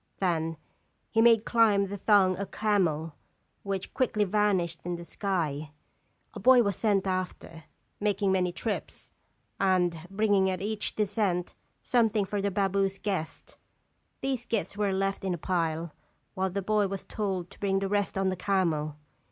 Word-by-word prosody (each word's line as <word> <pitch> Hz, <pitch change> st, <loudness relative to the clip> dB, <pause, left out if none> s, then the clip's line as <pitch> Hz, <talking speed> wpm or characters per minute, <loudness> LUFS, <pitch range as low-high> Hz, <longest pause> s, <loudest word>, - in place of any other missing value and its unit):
Then 165 Hz, -3 st, 0 dB, 0.5 s
he 225 Hz, -, +3 dB
made 230 Hz, -1 st, +5 dB
climb 215 Hz, -4 st, +4 dB
the 200 Hz, +1 st, -5 dB
thong 195 Hz, -2 st, +4 dB
a 200 Hz, 0 st, -3 dB
camel, 175 Hz, -7 st, 0 dB, 0.5 s
which 195 Hz, -1 st, -4 dB
quickly 225 Hz, -5 st, +1 dB
vanished 190 Hz, -4 st, +1 dB
in 175 Hz, 0 st, -3 dB
the 170 Hz, 0 st, -8 dB
sky; 155 Hz, -6 st, -2 dB, 0.6 s
a -, -, -7 dB
boy 255 Hz, -1 st, +6 dB
was 200 Hz, -3 st, 0 dB
sent 205 Hz, -4 st, +1 dB
after, 185 Hz, -3 st, -4 dB, 0.3 s
making 205 Hz, -1 st, +1 dB
many 180 Hz, -2 st, +1 dB
trips, 205 Hz, +4 st, -5 dB, 0.5 s
and 180 Hz, -3 st, +2 dB
bringing 200 Hz, -1 st, +2 dB
at 185 Hz, -, -2 dB
each 210 Hz, +1 st, -2 dB
descent 200 Hz, -4 st, 0 dB, 0.3 s
something 225 Hz, -4 st, +2 dB
for 205 Hz, +1 st, -2 dB
the 200 Hz, -, +1 dB
baboo's 195 Hz, 0 st, 0 dB
guests. 190 Hz, -6 st, -4 dB, 0.6 s
These 260 Hz, -3 st, -2 dB
gifts 200 Hz, -6 st, -1 dB
were 205 Hz, -1 st, 0 dB
left 195 Hz, +1 st, -1 dB
in 185 Hz, -2 st, 0 dB
a -, -, -7 dB
pile, 165 Hz, -2 st, -1 dB, 0.4 s
while 190 Hz, -1 st, -1 dB
the 195 Hz, +2 st, -3 dB
boy 210 Hz, 0 st, +2 dB
was 195 Hz, 0 st, -5 dB
told 190 Hz, -4 st, -3 dB
to -, -, -15 dB
bring 195 Hz, -1 st, +1 dB
the 195 Hz, 0 st, 0 dB
rest 205 Hz, 0 st, 0 dB
on 195 Hz, 0 st, +2 dB
the 185 Hz, -, -1 dB
camel. 165 Hz, -6 st, 0 dB
195 Hz, 160 wpm, -28 LUFS, 180-205 Hz, 0.6 s, boy